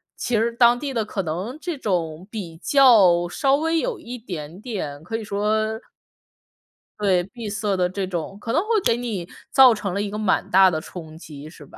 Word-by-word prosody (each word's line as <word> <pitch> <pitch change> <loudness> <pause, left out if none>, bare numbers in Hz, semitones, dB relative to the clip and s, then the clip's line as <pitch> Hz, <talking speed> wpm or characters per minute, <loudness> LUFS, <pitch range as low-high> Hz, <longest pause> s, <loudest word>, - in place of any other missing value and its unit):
其 245 - -2
实 225 +2 +1
当 235 0 +5
地 280 -1 -4
的 230 -3 0
可 205 -2 -4
能 180 - -4
这 340 -2 -4
种 175 - -2
比 180 -7 -7
较 195 - +5
稍 270 +8 +2
微 325 +3 0
有 - - -2
一 245 +2 -8
点 175 -7 -8
点， 185 - -5
可 225 +7 -4
以 225 - -6
说 215 +2 -1 1.2
对， 190 -4 +2
闭 220 +3 -8
塞 205 -1 -1
的 180 -1 +1
这 190 +1 -3
种， 180 +1 -5
可 230 +2 -4
能 320 - +3
会 - - -12 0.2
给 230 - +4
你 220 -8 -4 0.2
造 260 -3 +7
成 200 -4 -4
了 200 - -1
一 205 - -3
个 210 - -5
蛮 210 -3 0
大 190 0 +6
的 155 - -1
冲 160 -1 -10
击 150 -2 -11
是 155 -2 -14
吧？ - - -16
205 Hz, 220 characters per minute, -22 LUFS, 175-235 Hz, 1.2 s, 造